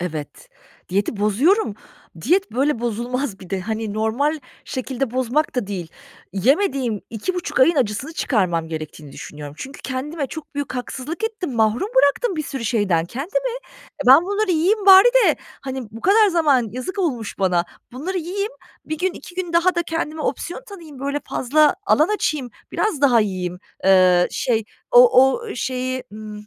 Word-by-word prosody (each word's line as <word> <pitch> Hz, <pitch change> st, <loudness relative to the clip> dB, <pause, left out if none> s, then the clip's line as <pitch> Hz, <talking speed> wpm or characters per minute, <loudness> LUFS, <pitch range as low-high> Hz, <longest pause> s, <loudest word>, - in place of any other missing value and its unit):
Evet. 165 Hz, -, -6 dB, 0.4 s
Diyeti 200 Hz, +4 st, -1 dB
bozuyorum. 220 Hz, -, +2 dB, 0.5 s
Diyet, 370 Hz, -, +1 dB
böyle, 270 Hz, 0 st, +1 dB
bozulmaz 240 Hz, -1 st, -3 dB
bir 185 Hz, -, -12 dB
de. 195 Hz, -1 st, -1 dB
Hani, 220 Hz, +1 st, -3 dB
normal 240 Hz, +9 st, 0 dB, 0.3 s
şekilde 260 Hz, -1 st, -3 dB
bozmak 260 Hz, +5 st, 0 dB
da 245 Hz, -6 st, -1 dB
değil. 185 Hz, -5 st, -5 dB, 0.4 s
Yemediğim 255 Hz, -, +1 dB
2,5 345 Hz, -, -3 dB
ayın 330 Hz, +5 st, +5 dB
acısını 255 Hz, +5 st, -1 dB
çıkarmam 175 Hz, -, 0 dB
gerektiğini 155 Hz, -2 st, -7 dB
düşünüyorum. 145 Hz, -1 st, -9 dB
Çünkü 270 Hz, +1 st, -8 dB
kendime 280 Hz, +3 st, -3 dB
çok 305 Hz, +1 st, -9 dB
büyük 285 Hz, -2 st, -4 dB
haksızlık 270 Hz, -, -5 dB
ettim, 425 Hz, -, -3 dB
mahrum 225 Hz, -, +1 dB
bıraktım 375 Hz, -, +3 dB
bir 310 Hz, -, -1 dB
sürü 270 Hz, -4 st, -5 dB
şeyden 200 Hz, -8 st, +1 dB
kendimi. 380 Hz, -, -3 dB, 0.5 s
E, 265 Hz, -, -9 dB
ben 270 Hz, +6 st, +8 dB
bunları 405 Hz, +1 st, 0 dB
yiyeyim 390 Hz, +5 st, +1 dB
bari 385 Hz, +4 st, +9 dB, 0.2 s
de, -, -, +3 dB, 0.2 s
hani, 265 Hz, -1 st, -5 dB
bu 225 Hz, -, -10 dB
kadar 415 Hz, -, +5 dB
zaman 290 Hz, -, +2 dB
yazık 255 Hz, -, -6 dB
olmuş 250 Hz, -, -2 dB
bana. 180 Hz, -3 st, +2 dB, 0.3 s
Bunları 360 Hz, +9 st, -3 dB
yiyeyim, 400 Hz, +6 st, -3 dB, 0.3 s
1 315 Hz, 0 st, -4 dB
gün, 370 Hz, 0 st, 0 dB
2 355 Hz, -, -12 dB
gün 360 Hz, -2 st, -4 dB
daha 345 Hz, +2 st, +3 dB
da 345 Hz, -, +1 dB
kendime 320 Hz, -2 st, -3 dB
opsiyon 350 Hz, -, -3 dB
tanıyayım, 330 Hz, -9 st, -11 dB
böyle, 280 Hz, +2 st, -2 dB
fazla 295 Hz, +5 st, +3 dB
alan 310 Hz, -2 st, +4 dB
açayım, 290 Hz, -10 st, -2 dB, 0.2 s
biraz 420 Hz, -10 st, -1 dB
daha 255 Hz, -5 st, +5 dB
yiyeyim, 185 Hz, -4 st, -3 dB, 0.3 s
eee, 185 Hz, -2 st, +5 dB
şey 225 Hz, -3 st, 0 dB, 0.3 s
o 485 Hz, -, +7 dB
o 470 Hz, -, -4 dB
şeyi, 255 Hz, +1 st, -3 dB
ımm, 210 Hz, -1 st, -9 dB
265 Hz, 160 wpm, -21 LUFS, 215-340 Hz, 0.5 s, bari